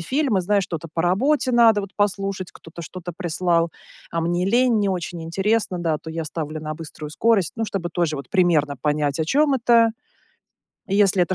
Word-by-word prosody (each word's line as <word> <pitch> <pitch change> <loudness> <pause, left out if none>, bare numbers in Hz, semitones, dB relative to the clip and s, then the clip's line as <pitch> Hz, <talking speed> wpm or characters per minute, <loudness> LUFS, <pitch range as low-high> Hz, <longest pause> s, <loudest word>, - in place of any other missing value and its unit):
фильмы, 255 - +1
знаешь, 200 +2 +1
что-то 165 -3 -6
по 165 - -1
работе 255 - +2
надо, 230 -3 +5
вот, 200 -1 -7
послушать, 195 -2 -1
кто-то 165 +1 -11
что-то 175 +1 -7
прислал, 170 -2 0 0.4
а 165 - -1
мне 175 +2 0
лень, 240 +1 +3
не 205 -1 +1
очень 175 -2 -3
интересно, 195 +3 0
да, 165 -3 0
то 160 - -9
я 165 0 -4
ставлю 155 0 -5
на 155 0 -4
быструю 155 -1 -8
скорость, 200 -1 +2
ну 225 - -1
чтобы 195 -5 -3
тоже, 170 -3 0
вот, 140 - -8
примерно 165 -7 +2
понять, 150 0 0
о 160 - +1
чём 285 - +3
это. 235 -2 +4 1.0
И, 195 - -1
если 195 -2 +4
это 185 +2 0
180 Hz, 190 wpm, -22 LUFS, 165-210 Hz, 1.0 s, надо